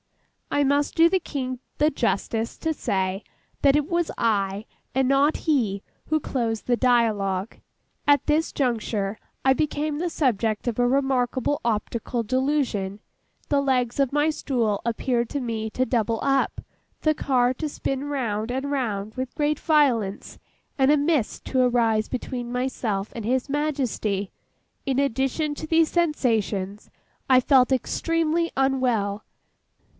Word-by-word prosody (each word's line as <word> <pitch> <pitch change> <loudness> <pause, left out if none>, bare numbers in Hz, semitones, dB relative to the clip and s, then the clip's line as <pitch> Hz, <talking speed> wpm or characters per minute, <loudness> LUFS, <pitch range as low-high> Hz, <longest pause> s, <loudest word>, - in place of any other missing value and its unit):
I 290 - +2
must 285 +1 +1
do 330 +1 +6
the 380 - +2
King 255 -6 -4 0.2
the 300 +1 +3
justice 225 -2 -1
to 320 -1 -1
say 190 -6 -1 0.4
that 280 -1 +5
it 295 -1 +1
was 340 -1 0
I, 205 -2 0 0.3
and 265 0 +2
not 275 +3 +3
he, 225 - +1 0.2
who 310 0 +2
closed 230 -6 -2
the 245 - +2
dialogue. 220 -6 +1 0.5
At 285 -2 +4
this 315 +2 +1
juncture, 220 -5 -1 0.3
I 265 - +6
became 300 +1 -1
the 350 +1 -1
subject 230 -8 0
of 235 - -1
a 245 - +4
remarkable 265 +1 +1
optical 230 +1 -1
delusion; 255 -6 0 0.5
the 285 -1 +2
legs 255 -2 0
of 275 -3 +2
my 295 +2 +2
stool 235 -9 -1
appeared 235 0 0
to 285 - -2
me 225 -3 -3
to 255 +4 0
double 230 -3 0
up; 275 -1 +1 0.4
the 310 - +3
car 255 -4 +1
to 300 +4 -4
spin 270 -1 -3
round 235 -6 -2
and 265 +3 -2
round 220 -6 -2
with 255 +1 -5
great 300 0 0
violence; 250 - +1 0.4
and 265 +1 +5
a 300 - +5
mist 290 -5 0
to 260 - +1
arise 230 -3 +2
between 245 -1 -4
myself 240 -5 -2
and 230 - -5
His 255 +4 0
Majesty. 265 -9 -1 0.5
In 265 -1 0
addition 275 +3 0
to 315 - -6
these 325 0 +3
sensations, 225 - 0 0.4
I 255 -1 +7
felt 255 0 +4
extremely 330 +5 0
unwell. 245 -7 +1
255 Hz, 145 wpm, -24 LUFS, 225-285 Hz, 0.5 s, I